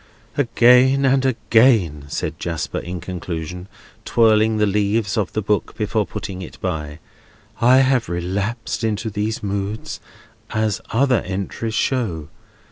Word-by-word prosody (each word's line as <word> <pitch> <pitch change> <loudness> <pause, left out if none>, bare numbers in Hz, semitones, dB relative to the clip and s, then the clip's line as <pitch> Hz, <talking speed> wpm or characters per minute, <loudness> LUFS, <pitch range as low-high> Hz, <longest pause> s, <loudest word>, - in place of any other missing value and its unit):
"Again 130 +1 +4
and 135 0 +3
again," 110 - +3
said - - -4
Jasper, 85 -3 -3
in 90 0 -6
conclusion, 90 0 -5 0.4
twirling 110 -1 +3
the 105 - +3
leaves 105 +1 0
of 105 -5 -1
the 110 - -1
book 105 +1 -1
before 105 -2 0
putting 95 -2 -6
it 90 - -10
by, 75 -5 -4 0.6
"I 125 +2 +6
have 130 -3 +2
relapsed 100 +8 -3
into 110 0 -1
these 105 +2 -2
moods, 100 +1 -3 0.5
as 110 0 -1
other 125 0 +3
entries 100 +4 -4
show. 90 - -1
105 Hz, 125 wpm, -21 LUFS, 90-115 Hz, 0.6 s, I